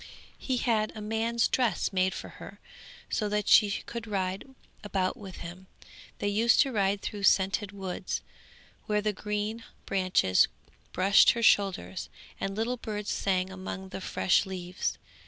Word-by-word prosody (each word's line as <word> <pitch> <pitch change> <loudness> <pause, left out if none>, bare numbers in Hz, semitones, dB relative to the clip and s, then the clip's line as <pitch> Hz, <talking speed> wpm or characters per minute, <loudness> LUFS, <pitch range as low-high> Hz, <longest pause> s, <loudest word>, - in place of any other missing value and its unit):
He 260 -2 -1
had 220 -3 +1
a - - -6
man's 225 +2 0
dress 245 -5 0
made 185 0 +1
for - - -7
her, - - -10 0.5
so 210 -2 -1
that 210 -1 -1
she 210 - +7 0.2
could 235 -1 -6
ride 190 +2 -2 0.3
about 190 -3 -1
with 200 -6 -10
him. 180 +2 -9 0.5
They - - -2
used 220 +4 +3
to 275 - +1
ride 200 -3 +1
through 205 - -4
scented 195 +1 +3
woods, 190 -2 -4 0.6
where 210 -1 +1
the 210 -1 +1
green 210 +3 -3 0.2
branches 185 - +3 0.4
brushed 195 +2 +5
her 235 - -3
shoulders, 185 - +2 0.3
and 195 0 -3
little 230 +4 -1
birds 210 -3 -4
sang 185 -1 0
among 190 0 -6
the 190 - -6
fresh 190 +1 +2
leaves. 180 -1 -3
200 Hz, 150 wpm, -29 LUFS, 190-215 Hz, 0.6 s, she